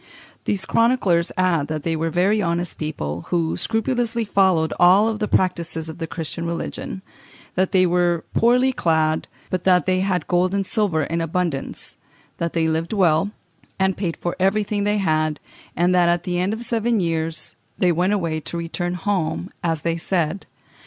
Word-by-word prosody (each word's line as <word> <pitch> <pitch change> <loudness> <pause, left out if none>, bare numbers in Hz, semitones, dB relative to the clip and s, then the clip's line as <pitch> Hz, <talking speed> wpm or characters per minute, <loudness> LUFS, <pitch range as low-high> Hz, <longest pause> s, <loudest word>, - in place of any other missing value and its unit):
These 190 -2 -1
chroniclers 205 -9 +2
add 175 -5 +2
that 155 -1 -4
they 165 -1 0
were 165 +1 -1
very 190 +6 +2
honest 170 -1 -2
people, 85 - -4
who 165 -2 0
scrupulously 235 0 0
followed 185 -6 +2
all 195 +5 +6
the 210 0 -2
practices 165 -4 0
of 160 - -9
the 165 - -3
Christian 165 0 -5
religion; 170 +2 -4 0.5
that 185 +1 +1
they 185 -1 +4
were 175 -1 +1
poorly 250 +3 +3
clad, 160 -5 +1 0.2
but 185 -1 -1
that 180 -4 +4
they 185 0 +2
had 190 -1 0
gold 180 +2 +2
and 195 -1 0
silver 185 -8 +1
in 165 +3 -2
abundance; 165 -3 -3 0.4
that 170 -1 -2
they 165 -1 +1
lived 160 +4 -1
well, 180 -2 +3 0.5
and 190 -1 +1
paid 175 -4 -3
for 175 - -3
everything 205 +1 +1
they 210 0 +2
had; 155 -5 0 0.4
and 175 +2 +2
that, 175 -1 +4
at 175 0 +1
the 180 -1 -1
end 185 +3 +1
of 220 +2 -4
seven 230 -1 +1
years, 165 -2 -2 0.2
they 180 -2 +3
went 180 +4 +1
away 170 -6 0
to 165 +3 -6
return 175 +1 -2
home, 180 -1 -2
as 165 -3 -1
they 165 0 0
said. 175 +1 -1
175 Hz, 175 wpm, -22 LUFS, 165-195 Hz, 0.5 s, all